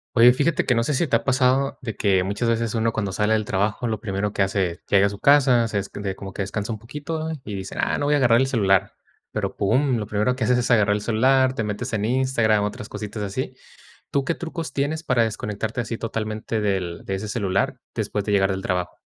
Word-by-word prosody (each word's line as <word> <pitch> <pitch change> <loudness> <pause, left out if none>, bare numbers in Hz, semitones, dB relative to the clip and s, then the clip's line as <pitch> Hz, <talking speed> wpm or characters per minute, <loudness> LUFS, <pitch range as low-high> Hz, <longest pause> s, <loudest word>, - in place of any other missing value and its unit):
Oye, 120 +1 +8
fíjate 145 +5 +1
que 125 - +3
no 115 - +2
sé 135 - -1
si 165 +6 +1
te 130 - -1
ha 115 - +3
pasado 130 +1 +2
de 115 -4 -4
que 95 -2 +2
muchas 100 +5 -1
veces 115 0 0
uno, 115 0 +1
cuando 100 -4 -2
sale 105 +3 +1
del 110 - +1
trabajo, 105 +4 -1
lo 110 -2 -2
primero 100 -1 -2
que 100 - +1
hace 95 -1 +1
es, 85 - -14
llega 100 0 +5
a - - +2
su 100 0 -8
casa, 130 -5 +5
se 105 - -1
es 100 - -5
de 100 -2 -4
como 95 0 -8
que 100 - -3
descansa 105 +3 -3
un 105 - -6
poquito 155 +6 -5
y 105 - -6
dicen: 95 0 -6
"Ah, - - +1
no, 145 - -1
voy 150 - +3
a - - +4
agarrar 120 -4 +4
el 130 - +2
celular", 100 -7 +2 0.4
pero, - - -3
pum, 125 +5 +2
lo 105 -2 -4
primero 105 +4 +1
que 130 - -6
haces 125 +2 +3
es 120 - 0
agarrar 105 -3 +4
el - - -3
celular, 130 +4 +3
te 115 - -2
metes 110 +4 -4
en 105 -2 -1
Instagram, 120 -4 +2
otras 105 +1 -5
cositas 105 +1 -6
así. 115 +6 -4 0.6
¿Tú 140 -1 +1
qué 165 - -1
trucos 165 -4 -5
tienes 145 +3 -1
para 125 -7 +2
desconectarte 110 +1 -3
así 115 -1 -4
totalmente 110 0 -3
del 95 -5 -2
de 95 - -3
ese 100 +3 -5
celular 100 -3 -1
después 105 - -2
de 105 - -3
llegar 95 -1 +3
del 95 0 -4
trabajo? 90 -2 -2
110 Hz, 245 wpm, -23 LUFS, 100-125 Hz, 0.6 s, Oye